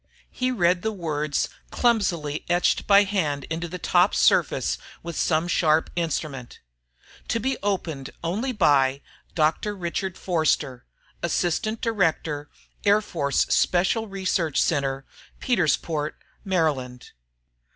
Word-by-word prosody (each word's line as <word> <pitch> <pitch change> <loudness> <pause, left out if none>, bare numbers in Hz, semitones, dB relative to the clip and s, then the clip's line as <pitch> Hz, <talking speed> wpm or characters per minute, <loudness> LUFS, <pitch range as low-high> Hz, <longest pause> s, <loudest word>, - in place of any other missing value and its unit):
He 255 0 -1
read 180 -7 +2
the 220 - -1
words 155 -6 -1 0.2
clumsily 175 -11 0
etched 175 0 +2
by 200 0 +7
hand 160 -9 -1
into 165 +1 -2
the 180 - -6
top 180 +2 +3
surface - - +2 0.2
with 170 -1 -6
some 160 +2 +1
sharp 160 -2 +2
instrument: 155 -6 -3 0.7
TO 230 - 0
BE 265 +4 0
OPENED 165 -9 -2
ONLY 210 +11 -1
BY: 140 - +3 0.3
Dr. 160 +6 +1
Richard 185 0 -3
Forster, 155 -7 0 0.3
Assistant 175 +6 -1
Director, 165 - 0 0.3
Air 205 +1 +4
Force 145 -9 -1
Special 190 +5 +2
Research 185 -5 -1
Center, 135 -4 0 0.3
Petersport, 160 - 0 0.3
Md. 140 -9 -1
170 Hz, 110 wpm, -24 LUFS, 150-195 Hz, 0.7 s, by